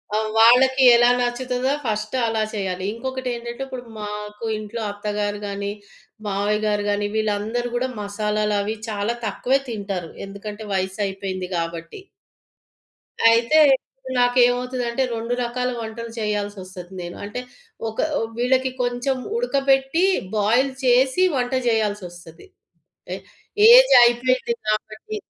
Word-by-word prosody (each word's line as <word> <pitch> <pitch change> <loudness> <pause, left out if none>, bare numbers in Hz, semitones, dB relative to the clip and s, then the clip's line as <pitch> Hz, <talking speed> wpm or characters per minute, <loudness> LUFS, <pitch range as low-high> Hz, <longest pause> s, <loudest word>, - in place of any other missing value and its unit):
ఆ! - - +3 0.2
వాళ్ళకి 260 +4 +6
ఎలా 240 0 +5
నచ్చుతుందో 250 +1 -1
ఫస్ట్ 215 +2 -2
అలా 220 -1 0
చేయాలి. 190 -3 -3
ఇంకొకటెంటంటే 240 0 -5
ఇప్పుడు 255 -2 -7 0.2
మాకు 210 +1 -6
ఇంట్లో 215 +2 -6
అత్తగారు‌ 205 0 -3
గాని, 200 0 -3 0.6
మావయ్య‌‌‌‌‌‌‌‌‌‌‌‌‌‌‌‌‌‌‌‌‌‌‌‌‌‌‌‌‌‌‌‌‌‌ 205 +2 0
గారు 205 -1 0
గాని 205 0 0
వీళ్ళందరూ 220 +3 -1
గూడా 255 +2 0
మసాలాలవి 210 0 -1
చాలా 210 +2 -1
తక్కువే 250 +6 +1
తింటారు. 200 -6 -4 0.2
ఎందుకంటే 205 +2 -8
వయసయిపెయింది 190 -1 -3
గాబట్టి. 165 - -4 1.3
అయితే 235 +7 +4 0.2
ఇప్పుడు 260 0 -12
నాకేమవుతదంటే, 245 0 +2
రెండు 230 +1 -3
రకాల 250 +1 -2
వంటలు 230 +1 -6
చేయాల్సొస్తది 200 -4 -4
నేను. 175 0 -7
అంటే 205 +4 -5 0.5
ఒక 220 - -10 0.2
ఆహ్, 225 - -2
వీళ్ళకి 260 +2 +1
కొంచెం 245 +2 -1 0.2
ఉడకబెట్టి 275 - +1 0.3
బాయిల్ 235 +6 +2
చేసి 260 +7 +4
వంట 250 0 -1
జేయాల్సొస్తది. 205 - -3 0.7
ఆహ్, - - -8 0.5
ఏజ్ - - +8
అయిపెయింది 255 - +2
కాబట్టి. 215 - -3
225 Hz, 110 wpm, -22 LUFS, 205-250 Hz, 1.3 s, ఏజ్